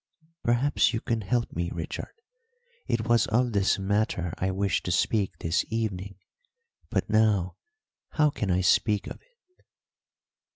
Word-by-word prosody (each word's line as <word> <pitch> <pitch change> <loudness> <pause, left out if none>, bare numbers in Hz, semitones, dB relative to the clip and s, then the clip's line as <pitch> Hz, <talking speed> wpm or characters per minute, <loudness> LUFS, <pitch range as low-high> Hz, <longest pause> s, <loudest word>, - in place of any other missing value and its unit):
"Perhaps 120 +2 +2
you - - 0
can 115 -1 -2
help 115 +4 -1
me, 85 +1 -1
Richard. 80 -1 -6 0.7
It 110 -1 -1
was 120 -1 +3
of 120 +2 +1
this 100 -2 +2
matter 95 -3 -1
I 95 - 0
wished 95 +1 0
to 90 - -1
speak 95 0 +1
this 80 +2 0
evening. 100 -4 -3 0.7
But - - -1
now 105 -4 +2 0.6
how 150 -2 +3
can 105 -8 -3
I 90 0 +2
speak 105 +3 +2
of - - -8
it?" 475 -7 -37
105 Hz, 140 wpm, -27 LUFS, 95-115 Hz, 0.7 s, was